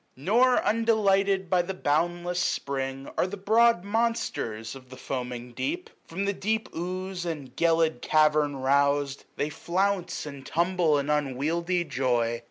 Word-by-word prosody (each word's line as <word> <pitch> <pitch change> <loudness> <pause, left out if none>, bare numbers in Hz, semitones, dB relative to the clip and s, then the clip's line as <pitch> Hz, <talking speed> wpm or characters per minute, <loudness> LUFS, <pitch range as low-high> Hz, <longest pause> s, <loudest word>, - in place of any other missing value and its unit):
> - - -43
Nor 235 - +3
undelighted 200 -4 +2
by 180 +1 +3
the 185 +2 -5
boundless 175 +3 0
Spring 135 -5 -2
Are - - +3
the 205 +2 -6
broad 220 0 +3
monsters 200 - -2
of 130 -2 -13
the 130 - -11
foaming 125 -2 -5
deep: 335 - -4 0.2
From 190 +4 -3
the 200 - 0
deep 220 +3 -1
ooze 185 +1 -4
and 145 -7 -5
gelid 165 -5 +2
cavern 150 -2 +3
rous'd, 140 +1 +1
S20 - - -20
They 145 - -1
flounce 185 +2 -1
and 140 -2 -8
tumble 170 -2 +1
in 140 +1 -1
unwieldly 155 +5 0
joy. 120 -5 0
170 Hz, 150 wpm, -27 LUFS, 140-195 Hz, 0.2 s, Nor